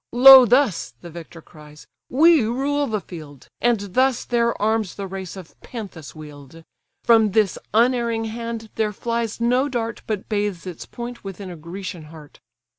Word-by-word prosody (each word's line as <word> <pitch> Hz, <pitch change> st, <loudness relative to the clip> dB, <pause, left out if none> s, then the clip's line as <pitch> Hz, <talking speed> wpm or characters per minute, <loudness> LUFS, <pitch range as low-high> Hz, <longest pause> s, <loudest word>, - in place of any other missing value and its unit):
"Lo 260 Hz, 0 st, +9 dB
thus 240 Hz, -, +1 dB
(the 170 Hz, -, -10 dB
victor 165 Hz, 0 st, -11 dB
cries) 150 Hz, -1 st, -15 dB, 0.2 s
we 320 Hz, +3 st, +5 dB
rule 275 Hz, +5 st, -1 dB
the 215 Hz, -3 st, -2 dB
field, 155 Hz, -6 st, -12 dB
And 240 Hz, -2 st, +2 dB
thus 260 Hz, 0 st, +2 dB
their 235 Hz, -1 st, 0 dB
arms 215 Hz, -3 st, 0 dB
the 200 Hz, -, -5 dB
race 190 Hz, -2 st, -7 dB
of 185 Hz, -4 st, -11 dB
Panthus 195 Hz, -, -9 dB
wield: 150 Hz, 0 st, -12 dB, 0.4 s
From 220 Hz, -4 st, +4 dB
this 210 Hz, -4 st, +1 dB
unerring 235 Hz, 0 st, +1 dB
hand 230 Hz, 0 st, -6 dB
there 215 Hz, -1 st, -1 dB
flies 230 Hz, +1 st, -3 dB
no 250 Hz, +4 st, +1 dB
dart 230 Hz, -3 st, -4 dB
But 215 Hz, -3 st, -3 dB
bathes 205 Hz, -4 st, -2 dB
its 180 Hz, -3 st, -8 dB
point 240 Hz, 0 st, -8 dB
within 195 Hz, -1 st, -8 dB
a -, -, -8 dB
Grecian 170 Hz, +1 st, -8 dB
heart. 150 Hz, -1 st, -14 dB
215 Hz, 160 wpm, -22 LUFS, 175-235 Hz, 0.4 s, Lo